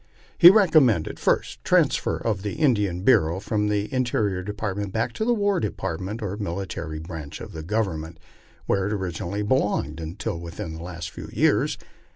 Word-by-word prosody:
He 175 Hz, -, +10 dB
recom 185 Hz, -8 st, +6 dB
mended: 100 Hz, -10 st, 0 dB
"First, -, -, 0 dB
the -, -, -8 dB
transfer -, -, +3 dB
of 105 Hz, -5 st, -2 dB
the 100 Hz, 0 st, -3 dB
Indian 105 Hz, -, +1 dB
Bureau 85 Hz, -7 st, +4 dB
from 105 Hz, +1 st, -1 dB
the 105 Hz, 0 st, 0 dB
Interior 110 Hz, -7 st, 0 dB
Depart 105 Hz, 0 st, -4 dB
ment 100 Hz, -1 st, -3 dB
back 115 Hz, +3 st, -1 dB
to 220 Hz, -, -2 dB
the 240 Hz, 0 st, +3 dB
War 205 Hz, -2 st, +1 dB
Department, 100 Hz, +1 st, -4 dB
or 100 Hz, 0 st, -3 dB
military 85 Hz, -5 st, -4 dB
branch 80 Hz, -2 st, -7 dB
of -, -, -8 dB
the 80 Hz, -, -7 dB
Government, 80 Hz, -4 st, -2 dB, 0.5 s
where 95 Hz, -1 st, +1 dB
it 105 Hz, -, -1 dB
originally 95 Hz, +1 st, -3 dB
belonged, 105 Hz, -, 0 dB
until 85 Hz, +1 st, -4 dB
within 85 Hz, -1 st, -6 dB
the 80 Hz, -, -8 dB
last 85 Hz, -2 st, -6 dB
few -, -, -9 dB
years. -, -, +2 dB
100 Hz, 180 wpm, -24 LUFS, 85-110 Hz, 0.5 s, He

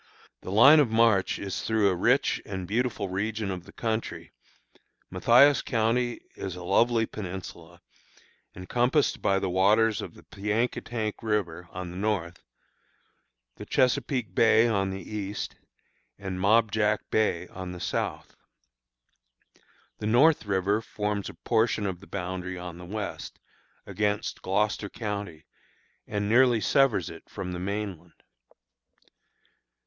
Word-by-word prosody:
The -, -, -7 dB
line 135 Hz, +10 st, +8 dB
of 140 Hz, -6 st, +3 dB
march 110 Hz, -4 st, +3 dB
is 100 Hz, -2 st, -4 dB
through 110 Hz, -2 st, +2 dB
a 95 Hz, -, 0 dB
rich 125 Hz, +10 st, +2 dB
and 95 Hz, -3 st, -6 dB
beautiful 110 Hz, -1 st, -1 dB
region 100 Hz, +2 st, -2 dB
of 90 Hz, -2 st, -7 dB
country. 110 Hz, -8 st, -3 dB, 0.8 s
Mathias 140 Hz, +4 st, +5 dB
county 120 Hz, +1 st, 0 dB
is 95 Hz, -3 st, -5 dB
a 90 Hz, -, -8 dB
lovely 115 Hz, +5 st, +3 dB
peninsula, 90 Hz, -4 st, -8 dB, 0.7 s
encompassed 125 Hz, -, +1 dB
by 95 Hz, -, +2 dB
the 95 Hz, -1 st, -1 dB
waters 105 Hz, +3 st, +3 dB
of -, -, -8 dB
the -, -, -16 dB
Piankatank 110 Hz, +1 st, -2 dB
River, 95 Hz, -6 st, -2 dB
on 90 Hz, -1 st, -6 dB
the 90 Hz, -, -8 dB
north, 95 Hz, -4 st, -2 dB, 1.2 s
the -, -, -8 dB
Chesapeake 125 Hz, -2 st, +1 dB
Bay, 115 Hz, 0 st, +5 dB
on 100 Hz, -4 st, 0 dB
the 95 Hz, -1 st, -6 dB
east, 105 Hz, -1 st, -5 dB, 0.6 s
and 95 Hz, -2 st, -5 dB
Mob 110 Hz, +2 st, +4 dB
Jack 105 Hz, -1 st, +1 dB
Bay, 90 Hz, -5 st, +1 dB
on 95 Hz, -1 st, -7 dB
the 90 Hz, -, -8 dB
south. -, -, -3 dB, 1.6 s
The 105 Hz, -, -3 dB
North 130 Hz, +2 st, +4 dB
River 100 Hz, +2 st, +1 dB
forms 105 Hz, -2 st, -3 dB
a -, -, -11 dB
portion 110 Hz, -2 st, +1 dB
of 95 Hz, -3 st, -2 dB
its 100 Hz, -, -15 dB
boundary 90 Hz, -1 st, -4 dB
on 90 Hz, -1 st, -8 dB
the 90 Hz, -, -9 dB
west, 105 Hz, +2 st, -6 dB, 0.5 s
against 105 Hz, +1 st, -2 dB
Gloucester 105 Hz, +1 st, 0 dB
county, 100 Hz, -9 st, -5 dB, 0.6 s
and 105 Hz, -1 st, -2 dB
nearly 120 Hz, +1 st, +4 dB
severs 115 Hz, -, +2 dB
it 85 Hz, -, -13 dB
from 95 Hz, -3 st, -5 dB
the 90 Hz, -, -4 dB
mainland. 95 Hz, -3 st, -5 dB
105 Hz, 130 wpm, -27 LUFS, 95-115 Hz, 1.6 s, line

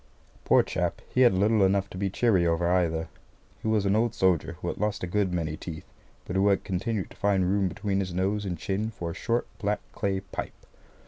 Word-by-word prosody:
Poor -, -, +5 dB
chap, -, -, -2 dB
he 130 Hz, -, +3 dB
had 125 Hz, -, +7 dB
little 105 Hz, +2 st, +3 dB
enough 95 Hz, +1 st, +2 dB
to -, -, -11 dB
be 100 Hz, 0 st, 0 dB
cheery 95 Hz, -4 st, +2 dB
over 85 Hz, +1 st, +1 dB
either. 85 Hz, -3 st, +1 dB, 0.5 s
He -, -, -4 dB
was 110 Hz, -2 st, +2 dB
an 100 Hz, +1 st, +3 dB
old 115 Hz, 0 st, +1 dB
soldier 95 Hz, -4 st, +2 dB
who -, -, -7 dB
had -, -, -5 dB
lost 105 Hz, -1 st, -1 dB
a -, -, +1 dB
good 95 Hz, +1 st, 0 dB
many 80 Hz, -3 st, -2 dB
teeth, 80 Hz, 0 st, -8 dB, 0.4 s
but 90 Hz, -, -5 dB
who 95 Hz, +1 st, +3 dB
had 100 Hz, -1 st, +3 dB
continued 100 Hz, +2 st, -2 dB
to -, -, -14 dB
find 100 Hz, -3 st, +2 dB
room 100 Hz, 0 st, +2 dB
between 100 Hz, +1 st, -2 dB
his 95 Hz, -2 st, -2 dB
nose 95 Hz, +4 st, 0 dB
and 90 Hz, -3 st, -3 dB
chin 100 Hz, +6 st, -2 dB
for 85 Hz, -6 st, -5 dB
a -, -, -6 dB
short 120 Hz, +6 st, -1 dB
black 105 Hz, -1 st, 0 dB
clay 95 Hz, -1 st, -1 dB
pipe. 95 Hz, -, -6 dB
95 Hz, 220 wpm, -27 LUFS, 90-105 Hz, 0.5 s, had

